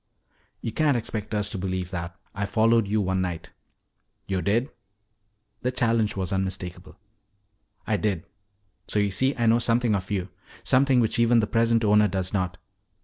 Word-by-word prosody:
"You 115 Hz, -, -3 dB
can't 145 Hz, +1 st, +2 dB
expect 110 Hz, -2 st, -4 dB
us 105 Hz, -1 st, +1 dB
to 100 Hz, -, -3 dB
believe 95 Hz, -1 st, -3 dB
that. 85 Hz, -2 st, -5 dB, 0.2 s
I 100 Hz, +1 st, -2 dB
followed 115 Hz, 0 st, +3 dB
you 105 Hz, +2 st, +1 dB
one 95 Hz, -1 st, 0 dB
night." 85 Hz, -3 st, -4 dB, 0.7 s
"Yo' 95 Hz, -2 st, -1 dB
did?" 115 Hz, +9 st, 0 dB, 0.9 s
The 125 Hz, -, 0 dB
challenge 115 Hz, -4 st, +1 dB
was 95 Hz, -1 st, -2 dB
unmistakable. 95 Hz, -1 st, -4 dB, 0.9 s
"I 110 Hz, -, +1 dB
did. 100 Hz, -6 st, -1 dB, 0.6 s
So -, -, -1 dB
you 100 Hz, -1 st, +2 dB
see 130 Hz, +8 st, +1 dB
I 120 Hz, -, +1 dB
know 115 Hz, +1 st, +4 dB
something 120 Hz, -1 st, +2 dB
of 95 Hz, -2 st, -2 dB
you. 95 Hz, -3 st, -2 dB, 0.3 s
Something 130 Hz, -1 st, +4 dB
which 115 Hz, 0 st, 0 dB
even 115 Hz, 0 st, +4 dB
the 110 Hz, -, +2 dB
present 115 Hz, +1 st, +2 dB
owner 105 Hz, 0 st, +5 dB
does 95 Hz, 0 st, -2 dB
not. 90 Hz, -3 st, -1 dB
105 Hz, 165 wpm, -25 LUFS, 95-115 Hz, 0.9 s, owner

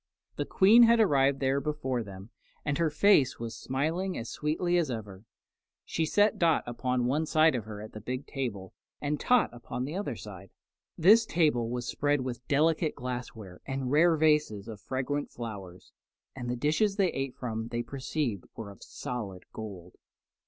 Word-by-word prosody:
The -, -, -2 dB
Queen 210 Hz, +5 st, +6 dB
had 235 Hz, 0 st, +6 dB
arrived 140 Hz, -9 st, +3 dB
there 135 Hz, +1 st, +1 dB
before 135 Hz, -5 st, -2 dB
them, 100 Hz, +1 st, -10 dB, 0.3 s
and 145 Hz, +2 st, -1 dB
her 165 Hz, -, +3 dB
was 150 Hz, -1 st, -6 dB
face 200 Hz, -11 st, +4 dB
was 115 Hz, -1 st, -5 dB
smiling 160 Hz, -, -2 dB
as 115 Hz, -, -5 dB
sweetly 165 Hz, +4 st, 0 dB
as 165 Hz, -5 st, +1 dB
ever. 105 Hz, -4 st, -6 dB, 0.6 s
She 160 Hz, -, -1 dB
set 205 Hz, +5 st, +3 dB
Dot 165 Hz, -3 st, +3 dB
upon 125 Hz, +1 st, -1 dB
one 150 Hz, +6 st, 0 dB
side 155 Hz, 0 st, +4 dB
of 120 Hz, -5 st, -3 dB
her 105 Hz, -1 st, -7 dB
at 110 Hz, -, -10 dB
the 110 Hz, -, -8 dB
big 130 Hz, +5 st, -4 dB
table 110 Hz, -, -5 dB, 0.3 s
and 145 Hz, 0 st, -2 dB
Tot 250 Hz, -1 st, +3 dB
upon 120 Hz, +1 st, -5 dB
the 145 Hz, -, -5 dB
other 190 Hz, -, -3 dB
side. 95 Hz, -3 st, -10 dB, 0.5 s
This 215 Hz, +7 st, +7 dB
table 145 Hz, -9 st, +2 dB
was 125 Hz, +1 st, -3 dB
spread 145 Hz, -1 st, +1 dB
with 125 Hz, -1 st, -6 dB
delicate 155 Hz, +2 st, +2 dB
glassware 120 Hz, -6 st, -6 dB
and 135 Hz, -1 st, -3 dB
rare 165 Hz, +2 st, +5 dB
vases 150 Hz, -10 st, +2 dB
of 110 Hz, -3 st, -8 dB
fragrant 135 Hz, +2 st, -2 dB
flowers, 100 Hz, -6 st, -8 dB, 0.4 s
and 125 Hz, -2 st, -5 dB
the 125 Hz, -, -1 dB
dishes 155 Hz, -, +1 dB
they 195 Hz, -4 st, +2 dB
ate 135 Hz, -1 st, -3 dB
from 110 Hz, -2 st, -4 dB
they 120 Hz, 0 st, -3 dB
perceived 130 Hz, -, -3 dB
were 105 Hz, -3 st, -7 dB
of 100 Hz, -, -16 dB
solid 100 Hz, -7 st, -6 dB
gold. 95 Hz, -5 st, -8 dB
130 Hz, 175 wpm, -29 LUFS, 115-155 Hz, 0.6 s, This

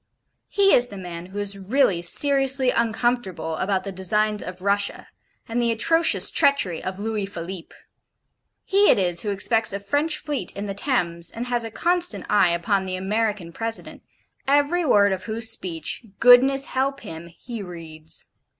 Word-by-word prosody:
He 395 Hz, -1 st, +3 dB
is 245 Hz, 0 st, +5 dB
the 205 Hz, -, -10 dB
man 175 Hz, -2 st, -8 dB
who 190 Hz, +2 st, -10 dB
is 200 Hz, -1 st, -1 dB
really 200 Hz, -3 st, +1 dB
seriously 270 Hz, +6 st, +4 dB
uncomfortable 230 Hz, -8 st, -1 dB
about 190 Hz, 0 st, -1 dB
the 195 Hz, -, -6 dB
designs 210 Hz, +3 st, 0 dB
of 185 Hz, 0 st, -8 dB
Russia, 200 Hz, 0 st, -1 dB, 0.4 s
and 235 Hz, +1 st, -2 dB
the 235 Hz, -1 st, +1 dB
atrocious 325 Hz, +9 st, +4 dB
treachery 280 Hz, -, +2 dB
of 185 Hz, 0 st, -5 dB
Louis 210 Hz, -1 st, -3 dB
Philippe. 175 Hz, -2 st, -8 dB, 0.9 s
He 405 Hz, +1 st, +3 dB
it -, -, +5 dB
is 175 Hz, -3 st, 0 dB
who 210 Hz, -, -3 dB
expects 220 Hz, +2 st, 0 dB
a 200 Hz, -, -3 dB
French 290 Hz, +10 st, 0 dB
fleet 290 Hz, -, -4 dB
in 200 Hz, -, -6 dB
the 200 Hz, -, -4 dB
Thames, 175 Hz, -, -2 dB
and 230 Hz, +6 st, -6 dB
has 240 Hz, -1 st, -1 dB
a 225 Hz, -, -5 dB
constant 350 Hz, +8 st, 0 dB
eye 200 Hz, -4 st, +4 dB
upon 190 Hz, +3 st, 0 dB
the 185 Hz, -1 st, -3 dB
American 200 Hz, -2 st, -2 dB
President, 225 Hz, +3 st, -4 dB, 0.5 s
every 290 Hz, +5 st, +2 dB
word 205 Hz, -9 st, +4 dB
of 190 Hz, -1 st, -4 dB
whose 225 Hz, 0 st, -2 dB
speech 175 Hz, -1 st, -5 dB, 0.2 s
(goodness 260 Hz, +3 st, +5 dB
help 270 Hz, +1 st, -2 dB
him!) 165 Hz, -5 st, -9 dB
he 225 Hz, +7 st, -9 dB
reads. 165 Hz, -4 st, -9 dB
210 Hz, 165 wpm, -23 LUFS, 185-250 Hz, 0.9 s, is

